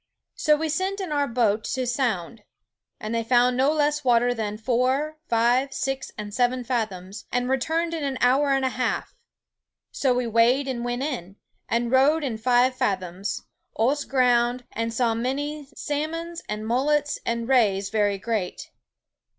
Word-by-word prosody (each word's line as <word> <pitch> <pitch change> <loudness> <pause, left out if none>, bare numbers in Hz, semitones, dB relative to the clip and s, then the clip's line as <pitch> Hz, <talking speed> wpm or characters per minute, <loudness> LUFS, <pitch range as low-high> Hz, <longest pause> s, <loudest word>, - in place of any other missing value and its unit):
So 305 -1 +3
we 320 +2 -2
sent 375 +6 -1
in 370 -5 -4
our 285 -1 +1
boat 225 -3 +1
to 260 -1 -1
sound, 235 -5 -1 0.6
and 215 +1 -4
they 230 0 0
found 245 +1 +3
no 265 +3 +3
less 295 -1 +1
water 245 -1 +3
than 215 -3 -3
foure, 260 +7 0
five, 240 +4 +2
six, 270 0 -3
and 210 -1 -6
seven 250 +2 +1
fathoms, 215 -5 -4
and 245 0 0
returned 320 +6 0
in 320 -3 -3
an 275 -2 -2
hour 270 +4 +3
and 270 -1 +2
a - - +2
halfe. 250 0 -2 0.8
So 265 - +1
we 250 0 +1
weighed 235 +4 +3
and 245 -3 -3
went 245 +2 -2
in, 215 - -4 0.3
and 235 +1 0
rode 285 +4 +4
in 235 -6 -3
five 250 +2 +3
fathoms, 190 -3 -2 0.3
ose 275 +6 +2
ground, 245 -1 +2
and 230 +1 -2
saw 230 0 +1
many 280 +5 -3
salmons, 330 +3 -3
and 210 +1 -3
mullets, 290 +5 +1
and 235 0 -2
rayes 200 -7 +2
very 205 -2 +1
great. 205 -3 -3
250 Hz, 160 wpm, -25 LUFS, 230-280 Hz, 0.8 s, rode